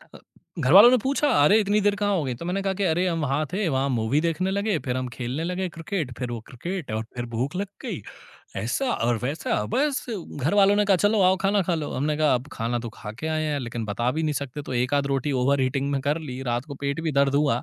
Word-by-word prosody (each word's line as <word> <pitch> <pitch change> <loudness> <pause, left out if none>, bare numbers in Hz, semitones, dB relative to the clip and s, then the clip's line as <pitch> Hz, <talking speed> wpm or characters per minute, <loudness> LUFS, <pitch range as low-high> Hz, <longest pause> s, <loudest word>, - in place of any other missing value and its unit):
अ, - - -9 0.4
घरवालों 195 - +8
ने 255 - +5
पूछा 280 +2 +1 0.2
अरे! 210 +8 +6
इतनी 205 +1 +2
देर 205 0 +2
कहाँ 205 0 0
हो 160 - 0
गई? 130 -2 -2
तो 170 - -8
मैंने 190 +3 -1
कहा 195 -1 0
कि 200 +1 -2
अरे! 175 +1 +2
हम 165 -3 -1
वहाँ 145 +2 0
थे, 200 -2 0
वहाँ 135 0 0
मूवी 125 +4 +1
देखने 170 +3 0
लगे, 200 -1 0
फिर 125 0 -1
हम 130 - -2
खेलने 130 +5 -3
लगे 180 +2 -2
क्रिकेट, 165 -3 -4
फिर 125 -2 -4
वो 120 - -4
क्रिकेट 170 - -5
और 110 +1 -2
फिर 120 - -3
भूख 135 +8 -2
लग 200 +1 -2 0.2
गई, - - -4 0.6
ऐसा 120 - -1
और 120 +1 +1
वैसा, 135 -5 -1
बस 285 0 +1
घरवालों 195 +6 +2
ने 210 - +3
कहा 195 -2 +4
चलो 210 -1 +2
आओ 185 +1 +5
खाना 200 0 +3
खा 175 -1 0
लो। 155 -3 -3
हमने 150 +3 -1
कहा 155 -3 +3
अब 125 +3 -3
खाना 115 +2 -2
तो 115 0 -5
खा 105 - -7
के 160 - -3
आए 155 0 0
हैं 150 -2 -1
लेकिन 120 -2 -4
बता 120 +4 -1
भी 160 - 0
नहीं 155 - 0
सकते 140 +2 -6
तो 130 - -7
एकाध 140 +3 +1
रोटी 140 +1 -1
ओवरईटिंग 140 +1 +1
में 140 - 0
कर 145 +4 0
ली। 130 -5 -7
रात 120 +1 -1
को 145 - -7
पेट 140 +3 -1
भी 160 -2 -2
दर्द 140 0 +2
हुआ 140 -4 +2
150 Hz, 250 wpm, -25 LUFS, 130-190 Hz, 0.6 s, घरवालों